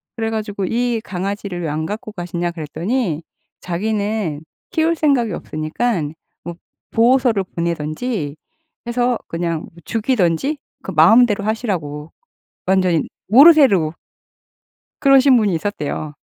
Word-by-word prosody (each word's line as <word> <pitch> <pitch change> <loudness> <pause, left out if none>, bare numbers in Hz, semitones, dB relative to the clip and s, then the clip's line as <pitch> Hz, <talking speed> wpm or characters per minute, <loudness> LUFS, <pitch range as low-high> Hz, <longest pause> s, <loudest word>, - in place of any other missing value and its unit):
그래 225 -1 -2
가지고 210 -3 -3
이 235 +1 0
강아지를 190 -1 -4
왜 160 - -2
안 155 +2 -2
갖고 210 +3 -5
가시냐 175 -2 -3
그랬더니 170 - -2 0.4
자기는 200 -3 -2 0.3
키울 330 -1 +2
생각이 275 -8 +1
없으니깐 155 +1 -2 0.3
뭐 170 -1 -6 0.4
보호소로 240 -3 +3
보내든지 170 - -2 0.5
해서 245 0 +1
그냥 165 -1 -3 0.2
죽이든지 225 - 0 0.3
그 - - -5
마음대로 205 +6 +5
하시라고 165 -10 -3 0.6
완전히 185 -4 +2 0.2
모르쇠로 240 - +6 1.1
그러신 275 -1 +6
분이 210 -5 +2
있었대요. 155 -5 -3
200 Hz, 275 characters per minute, -19 LUFS, 165-240 Hz, 1.1 s, 모르쇠로